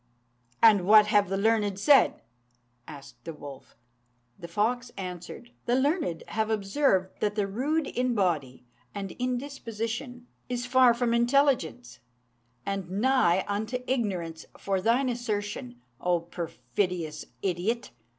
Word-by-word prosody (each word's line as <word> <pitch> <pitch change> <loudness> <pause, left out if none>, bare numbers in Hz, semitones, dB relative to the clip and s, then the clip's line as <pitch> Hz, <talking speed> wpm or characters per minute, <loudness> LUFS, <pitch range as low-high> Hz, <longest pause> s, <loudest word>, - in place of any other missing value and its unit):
"And 205 -5 +6
what 210 0 +8
have 205 -2 +3
the 195 - -1
learned 205 -1 +1
said?" 280 +4 +4 0.6
asked 140 -2 -12
the 165 - -7
wolf. 140 -2 -11 0.6
The 170 - -8
fox 235 +5 -1
answered, 180 +5 -7 0.2
"The 240 - +3
learned 280 - 0
have 220 0 -1
observed 195 -2 +1
that 210 -1 0
the 205 -2 +1
rude 280 +10 -1
in 250 -2 -1
body 150 - -1 0.3
and 195 -2 -4
in 250 0 0
disposition 245 -2 -5 0.2
is 245 0 -2
far 250 -1 +5
from 240 -1 0
intelligence, 235 - +1 0.7
and 195 -3 -3
nigh 195 -3 +2
unto 215 +4 -2
ignorance; 185 -11 -2
for 195 -1 -1
thine 235 +6 +2
assertion, 205 - -3 0.2
O 175 -1 +1
perfidious 170 -1 -3 0.2
idiot! 195 +6 -1
210 Hz, 125 wpm, -28 LUFS, 180-245 Hz, 0.7 s, what